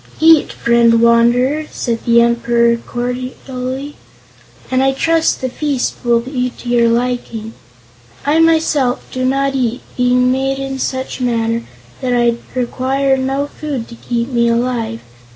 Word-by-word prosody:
"Eat, 320 -1 +5
friend 235 -1 +3
Wanderer," 240 +6 +3
said 230 -2 -3
the 235 0 +5
Emperor 235 0 +2
cordially, 255 +3 -5 0.8
"and 255 0 +2
I 270 0 +2
trust 330 +3 +1
the 260 - -1
feast 275 0 -2
will 235 -1 +3
be 250 0 -2
to 245 - -13
your 235 -1 +3
liking. 235 -2 -2 0.7
I, 300 +3 +3
myself, 315 -6 +2
do 255 - -3
not 275 +1 +1
eat, 250 -2 -1
being 250 0 +2
made 270 +1 0
in 270 0 -4
such 260 0 -3
manner 230 -1 0 0.4
that 250 -1 0
I 240 -1 +2 0.2
require 265 +2 0
no 270 +2 -1
food 285 -5 -5
to 235 - -10
keep 235 +1 -3
me 235 -2 +1
alive. 235 - -1
250 Hz, 140 wpm, -16 LUFS, 235-270 Hz, 0.8 s, Eat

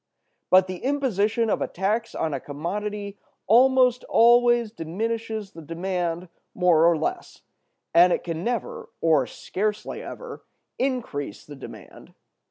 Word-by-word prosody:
"But 185 0 +6
the 185 -1 -6
imposition 235 -5 +1
of - - 0
a - - 0
tax 215 +5 -2
on 160 -2 -1
a 135 - -2
commodity 200 +8 -5 0.3
almost 250 +2 +4
always 240 -1 +4
diminishes 220 +3 -4
the 165 - -11
demand 175 +1 -3 0.3
more 170 -2 +5
or 170 - +2
less; 155 - -4 0.5
and 175 +2 +6
it - - 0
can 165 -1 -4
never, 465 - -3
or 155 -6 +3
scarcely 210 +2 -4
ever, 485 -2 -9 0.4
increase 240 - -3
the 145 - -10
demand. 135 - -12
200 Hz, 130 wpm, -24 LUFS, 170-235 Hz, 0.5 s, But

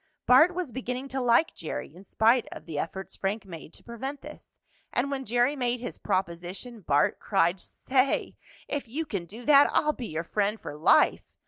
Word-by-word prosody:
Bart 310 +8 +6
was 355 -8 -3
beginning 255 +2 -4
to 265 0 -2
like 245 +6 +3
Jerry 155 -2 -6
in 185 - -13
spite 230 +4 +3
of - - -9
the 160 -3 -4
efforts 190 +5 -5
Frank 200 +2 -3
made 165 -4 -10
to - - -13
prevent 265 +4 -6
this. - - -13 0.3
And 275 +3 0
when 270 -1 -3
Jerry 245 +5 +2
made 245 -2 -1
his 245 - -7
proposition, 190 +4 -3
Bart 145 -4 +2
cried: 185 -2 +1
"Say, 260 +7 0 0.3
if 285 -4 -3
you 300 +8 -3
can 195 - -4
do 225 +7 -11
that 290 -1 +7
I'll 300 0 +2
be 245 -5 -6
your 160 +1 -3
friend 210 +4 -1
for 145 - -7
life! 155 +3 +4
235 Hz, 190 wpm, -27 LUFS, 185-265 Hz, 0.3 s, that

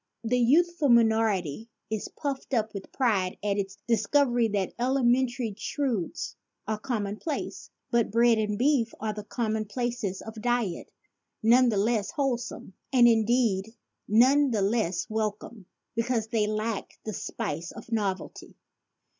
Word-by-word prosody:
The 250 +2 +1
youth 340 +8 +3
ful 290 -3 +2
minority 220 -5 +2 0.2
is 220 -2 -2
puffed 275 -2 -4
up 220 -1 0
with 200 -2 -8
pride 200 -8 +1
at 205 -1 0
its 195 0 -4
discovery 240 +2 +3
that 200 -3 -1
elementary 250 -2 +1
truths 265 - -3 0.3
are 215 -1 -2
common 210 -3 -3
place. 310 +2 -5 0.2
But 235 -2 +2
bread 230 +1 +4
and 210 -1 -1
beef 255 -2 +2
are 215 -1 -2
the 210 0 -7
common 220 0 -2
places 235 -3 -3
of 220 0 -8
diet, 240 -7 -1 0.5
none 245 +3 +6
the 215 - 0
less 210 -1 +1
wholesome, 245 -8 -3 0.2
and 245 -3 +6
in 225 -2 +4
deed 225 -3 +1 0.3
none 265 +6 +5
the 215 -5 0
less 195 -2 0
welcome, 215 -2 -4 0.3
because 230 -1 -1
they 215 -2 +1
lack 215 0 -3
the 215 - -3
spice 165 -1 -4
of 230 0 -11
novelty. 200 -4 -3
225 Hz, 145 wpm, -27 LUFS, 210-245 Hz, 0.5 s, none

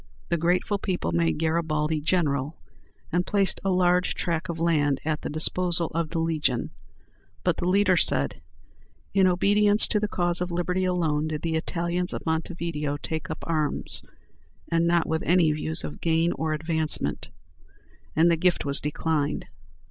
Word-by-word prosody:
The 170 - +1
grateful 180 +5 +1
people 180 - -2
made 85 -1 +1
Garibaldi 160 -1 0
"General," 150 -3 0 0.5
and 175 +1 +2
placed 200 0 +1
a 195 - 0
large 180 -1 +2
tract 170 +1 -2
of 170 - -3
land 150 -5 +1
at 155 -1 -1
the - - -4
disposal 170 +2 +1
of 165 -1 -1
the 165 - -4
Legion; 160 -6 0 0.7
but - - +1
the 175 - -2
leader 195 0 +4
said, 70 - 0 0.7
"In 190 -1 +4
obedience 205 +3 +3
to 210 - +2
the 210 - 0
cause 175 -3 0
of 180 - -1
liberty 180 +2 -1
alone 160 -4 0
did 155 -1 -4
the 165 -1 -1
Italians 170 +2 -2
of - - -6
Montevideo 160 -3 -2
take 160 +1 -5
up - - -6
arms, 155 -3 0 0.7
and 165 0 +2
not 170 -1 +3
with 160 0 -1
any 175 -2 +3
views 155 +2 -1
of - - -7
gain 165 +1 +2
or 160 -2 -2
advancement," 160 0 -1 0.9
and 165 +2 +5
the 165 - +2
gift 175 -1 +1
was 140 0 0
declined. 150 0 -1
165 Hz, 160 wpm, -26 LUFS, 155-180 Hz, 0.9 s, and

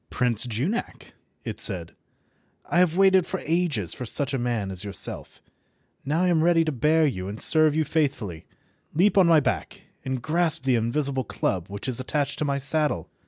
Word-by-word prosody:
"Prince 125 -2 0
Junak," 135 - -4 0.3
it - - -5
said, - - 0 0.7
"I 175 - +1
have 180 -1 +2
waited 190 -1 +5
for - - -5
ages 155 - 0
for - - -7
such 140 +4 0
a 135 - 0
man 115 -5 -2
as 95 0 -4
yourself. 100 -2 0 0.6
Now 155 +6 0
I - - +2
am 160 -3 +2
ready 165 -1 +3
to 155 - -1
bear 155 +4 +2
you 95 -10 -2
and 105 +3 -6
serve 155 -2 +3
you 160 - +2
faithfully. 135 - -2 0.5
Leap 190 +6 +3
on 190 -3 +5
my 165 -2 +6
back 145 - -3 0.2
and 130 -1 -3
grasp 160 +3 0
the 135 -1 +2
invisible 130 +4 0
club 95 -5 -2
which 100 +5 -7
is 130 -2 -3
attached 140 +2 -2
to 150 - 0
my 140 -1 0
saddle. 140 - -1
140 Hz, 185 wpm, -25 LUFS, 115-160 Hz, 0.7 s, my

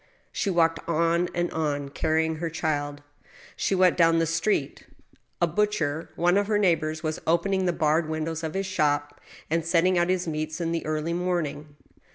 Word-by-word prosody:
She - - -1
walked 165 -2 +2
on, 170 +2 +2
and 175 0 0
on, 145 -3 -2
carrying 160 +2 0
her 165 +1 -3
child. 145 -3 -2 0.5
She 195 - 0
went 185 -1 +4
down 165 -1 +5
the 165 - +2
street. 165 -1 -1 0.6
A 175 - +4
butcher, 165 -4 -1
one 175 +3 +3
of 205 - -1
her 210 -1 +2
neighbors, 165 -5 +1
was 155 0 -3
opening 185 +3 +1
the - - +3
barred 155 0 +1
windows 160 +1 -3
of 160 +1 -4
his 195 0 -1
shop, 145 -5 -1 0.3
and 165 +1 0
setting 175 +2 +3
out 175 +1 +1
his 185 -1 0
meats 155 +1 -3
in 165 -1 -1
the 165 -1 -2
early 155 +2 -1
morning. 155 -5 -2
165 Hz, 180 wpm, -26 LUFS, 155-175 Hz, 0.6 s, down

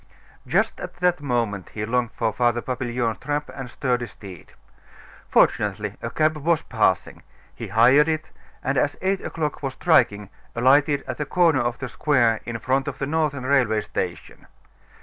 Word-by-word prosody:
Just - - +1
at - - -7
that 175 -2 +1
moment 115 - -2
he 105 0 -2
longed 120 +1 -1
for 110 -2 -1
Father 120 +1 +1
Papillon's 120 -2 -2
trap 145 0 -3
and 130 -2 -7
sturdy 125 -1 -1
steed. 95 -7 -12 0.8
Fortunately, 105 0 +2
a 115 - -3
cab 155 +4 +1
was 160 +2 +1
passing: - - 0 0.3
he - - -7
hired 130 +7 +5
it, 155 -1 -2 0.3
and 135 0 +1
as 145 +2 0
eight 190 0 +1
o'clock 155 -2 -3
was 135 -2 -3
striking, 105 - +2 0.2
alighted 140 +4 +3
at - - -6
the 150 - -1
corner 165 -6 +3
of 120 0 -1
the 130 - -5
square 120 -4 +2
in 115 -1 -3
front 130 +4 0
of - - -4
the 135 - -2
Northern 145 -3 -1
Railway 130 -5 +2
Station. - - -5
130 Hz, 165 wpm, -23 LUFS, 115-150 Hz, 0.8 s, hired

